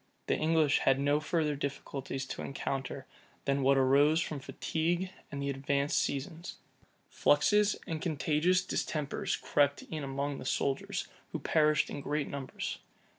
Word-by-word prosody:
The - - +1
English 155 -2 +3
had 135 0 +3
no 145 +1 +3
further 155 -1 0
difficulties 135 -1 -4
to - - -4
encounter 135 -1 -4 0.4
than 140 0 +1
what 135 +1 +4
arose 140 +4 +5
from 155 -4 -2
fatigue 170 +6 -1 0.2
and 140 - -4
the 140 - 0
advanced 140 +1 +1
season. 145 +4 -2 0.7
Fluxes 210 +8 +3
and 160 -1 -4
contagious 165 +2 +2
distempers 150 -5 -1
crept 145 -1 +1
in 155 -2 -5
among 140 +1 -2
the - - -8
soldiers, 135 -1 -1 0.3
who - - -2
perished 150 -1 +2
in 145 - -4
great 145 +1 -1
numbers. 140 -2 -5
145 Hz, 140 wpm, -31 LUFS, 140-155 Hz, 0.7 s, arose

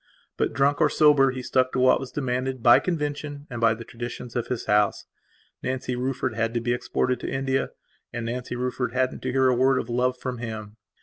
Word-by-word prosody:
But, - - -1
drunk 140 +4 +2
or - - +5
sober, 145 -3 +5
he 130 -1 -5
stuck 130 0 +1
to - - 0
what 130 0 +5
was 135 -1 -7
demanded 130 -2 -2
by 120 - +8
convention 145 -3 -3
and 120 -1 -5
by 115 -1 +4
the 115 - -8
traditions 120 +1 -7
of 120 - -1
his 125 - -3
house. 105 -1 +2 0.6
Nancy 130 -1 -2
Rufford 130 0 -2
had 115 +1 -1
to - - +2
be 120 +1 0
exported 125 +1 -1
to - - -4
India, 135 0 -1 0.4
and 120 -1 -4
Nancy 125 +1 -4
Rufford 125 -1 -2
hadn't 130 0 0
to 130 - -2
hear 130 0 +3
a 130 - +4
word 130 +2 +3
of 120 - -3
love 125 +1 +1
from 125 -1 -5
him. 110 -2 -6
125 Hz, 210 wpm, -25 LUFS, 120-130 Hz, 0.6 s, by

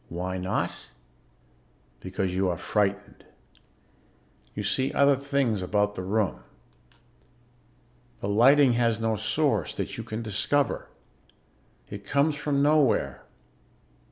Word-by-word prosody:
Why 90 +2 -4
not? 90 +1 -1 1.3
Because 95 +2 -3
you 95 0 +1
are 85 - -2
frightened. 100 +1 -2 1.3
You - - -3
see 130 0 0
other 140 0 +4
things 135 -6 -1
about 105 +2 0
the 95 - -5
room. 100 +1 -1 1.8
The - - -4
lighting 125 +6 +5
has 115 -2 +1
no 115 0 0
source 110 - 0
that - - -4
you - - -4
can 110 +2 -5
discover. 115 +6 -1 1.0
It 100 0 -8
comes 140 +8 +1
from 145 -1 0
nowhere. 145 -4 +2
110 Hz, 110 wpm, -26 LUFS, 100-140 Hz, 1.8 s, lighting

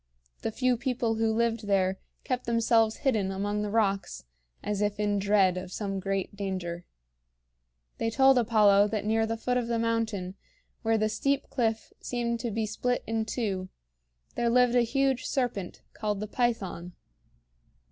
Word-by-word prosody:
The 225 - -2
few 255 +2 +1
people 240 -1 -1
who 225 0 +1
lived 230 -1 0
there 190 -1 +1 0.2
kept 250 -1 -2
themselves 230 -1 +3
hidden 215 -8 +2
among 205 +2 -2
the 210 - -2
rocks 200 -2 0 0.4
as 205 -1 -2
if 205 0 0
in 205 -1 +1
dread 195 -2 +3
of 185 0 -6
some 195 -1 -3
great 195 +1 -2
danger. 185 -3 -4 1.1
They 225 - 0
told 265 +2 +5
Apollo 210 -3 +5
that 210 -1 -3
near 220 +1 +2
the 225 0 -2
foot 250 +2 0
of 240 -2 -1
the 235 -1 0
mountain 225 -5 -1 0.5
where 225 0 +2
the 215 0 +2
steep 275 +6 -1
cliff 225 -3 -1
seemed 235 -1 -2
to 235 - -2
be 220 +1 -1
split 245 +4 -1
in 225 -1 -1
two 200 -5 -2 0.6
there 235 -1 0
lived 250 0 +4
a 245 - +5
huge 265 +2 +1
serpent 240 -9 -2
called 210 -2 -2
the 215 - -3
Python. 200 -7 -2
220 Hz, 160 wpm, -28 LUFS, 200-235 Hz, 1.1 s, told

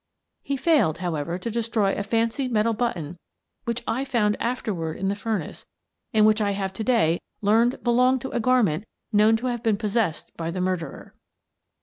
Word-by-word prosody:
He 280 - -2
failed, 275 - +3
however, 170 -1 -2
to 205 +5 -4
destroy 225 -3 0
a - - -2
fancy 230 +5 0
metal 230 -1 +1
button 180 -8 -3 0.5
which 235 0 -2
I 245 +4 -1
found 215 -6 +1
after 235 -3 -1
ward 160 -3 -4
in 195 - -1
the 200 - 0
furnace 205 -6 -4 0.4
and 215 -3 +4
which 215 0 +4
I 200 -1 +1
have 195 -1 -3
to 220 - -4
day 215 -9 +2 0.2
learned 230 +5 +3
belonged 250 +1 +3
on - - -5
a - - 0
garment 220 -7 +2 0.3
known 215 +2 +5
to 240 - -6
have 240 -2 -1
been 225 -3 +1
possessed 210 -5 -1
by 165 0 -4
the 180 +2 -4
murderer. 180 -2 -3
215 Hz, 185 wpm, -25 LUFS, 190-235 Hz, 0.5 s, known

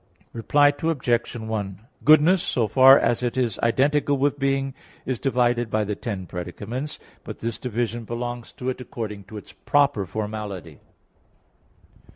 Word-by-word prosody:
Reply 145 +5 +4
Obj. 130 -7 0
1: 105 -4 -4 0.2
Goodness, 155 +4 +6
so 115 -3 0
far 130 +5 +8
as 120 - +1
it 125 0 -2
is 120 -6 0
identical 140 +4 +2
with 145 +1 0
being, 135 -1 0 0.3
is 130 -3 -2
divided 120 -3 +1
by 110 0 +1
the 105 0 -3
ten 100 -4 -5
predicaments. 100 - -6 0.3
But - - -8
this 115 0 -4
division 120 -1 -3
belongs 120 +1 -5
to 125 - -7
it 130 - -4
according 105 -4 -6
to 105 +2 -9
its 105 - -11
proper 140 -9 +1
formality. 105 -5 -5
120 Hz, 145 wpm, -24 LUFS, 105-135 Hz, 0.3 s, far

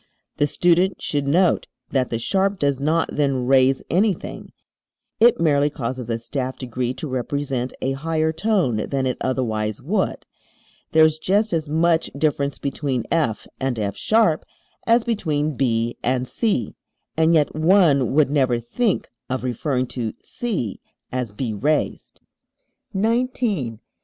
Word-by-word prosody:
The 145 - +2
student 175 +4 +2
should 145 -2 -1
note 175 +5 +3 0.2
that 130 -2 +1
the 115 - -1
sharp 195 - 0
does 140 -4 0
not 155 +4 +1
then 135 -4 +1
raise 130 0 +4
anything; 190 +1 -1 0.7
it 235 +1 +5
merely 145 -3 +3
causes 125 -3 -4
a 115 - 0
staff 130 +2 -4
degree 125 -1 -3
to 155 - -5
represent 130 0 -2
a 135 - +1
higher 160 +3 -1
tone 175 - +1
than 135 -1 0
it 130 -2 -2
otherwise 110 -5 -1
would. - - -1 0.7
There 160 0 +6
is 155 0 +1
just 205 +4 +1
as 160 -2 -1
much 165 +1 +2
difference 140 -1 0
between 135 -3 -2
F 135 -10 0
and 130 -2 -1
F[sharp] 155 - +2 0.5
as 230 0 +4
between 155 - -1
B 120 -2 0
and 125 +1 0
C, 210 - -1 0.4
and 160 +1 +4
yet 150 -2 +2
one 155 -5 +4
would 145 -1 +3
never 130 -4 +2
think 190 - -1 0.2
of 130 0 -2
referring 130 +1 -1
to 115 -4 -3
C 190 - -3 0.3
as 125 -4 -2
"B 110 +2 -3
raised"! 145 +9 -1 0.7
[Illustration: 230 +5 +2 0.4
Fig. 110 - -14
140 Hz, 140 wpm, -22 LUFS, 125-165 Hz, 0.7 s, There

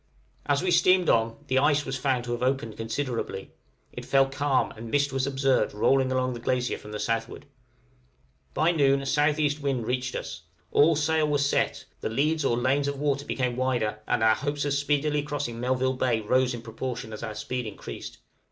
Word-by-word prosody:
As 145 +2 +2
we 185 - +1
steamed 180 +1 +4
on, 115 0 +2
the 130 -1 +2
ice 145 0 +2
was 135 - -3
found 130 -2 0
to 120 - -5
have 120 0 -3
opened 130 -4 -1
considerably; 115 +3 -4 0.4
it - - -7
fell 135 0 +4
calm, 135 0 0
and 115 +1 -9
mist 145 +2 +1
was 135 0 0
observed 135 -6 +1
rolling 130 +4 +3
along 130 0 0
the 120 - -6
glacier 125 +1 -1
from 105 - -11
the 105 - -5
southward. 115 +1 -2 1.1
By 160 +2 +3
noon 140 -4 +3
a - - -7
S.E. 145 +1 +2
wind 135 -5 -1
reached 125 +1 -2
us; 80 0 -5 0.3
all 160 +2 +5
sail 155 +1 +1
was 145 -1 +1
set, - - 0
the - - -3
leads 150 +7 +1
or 120 -3 +1
lanes 135 +3 +1
of 140 0 -2
water 140 0 -1
became 125 -2 -1
wider, 120 -5 0
and - - +1
our 110 0 +6
hopes 145 +3 -2
of 145 - 0
speedily 145 +1 +1
crossing 145 -5 -4
Melville 130 +1 +1
Bay 125 -3 +1
rose 125 +3 +2
in 115 - -9
proportion 120 0 -5
as 105 - -7
our 110 -2 -5
speed 125 0 -4
increased. 105 - -8
130 Hz, 195 wpm, -27 LUFS, 120-145 Hz, 1.1 s, our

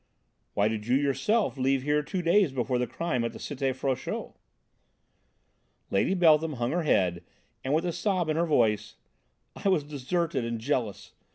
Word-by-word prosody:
"Why 100 +1 +3
did 110 0 -3
you 125 +2 +4
yourself 145 - +1
leave 135 0 +1
here 150 +1 +2
two 180 +5 -4
days 170 -1 +4
before 125 -1 -1
the 125 - 0
crime 130 -8 -2
at 115 - -2
the - - -8
Cité 135 -2 -2
Frochot?" 130 -1 -3 1.6
Lady 100 - +2
Beltham 160 -3 +4
hung 120 -2 -2
her 175 - 0
head 90 - +1 0.4
and 130 - -2
with 165 +3 0
a 175 - 0
sob 180 0 0
in 155 - 0
her 170 +1 +1
voice: 105 -8 +1 0.6
"I 200 - -1
was 180 -6 +2
deserted 150 0 -2
and 115 0 -3
jealous. 115 -4 -2
140 Hz, 170 wpm, -28 LUFS, 120-170 Hz, 1.6 s, you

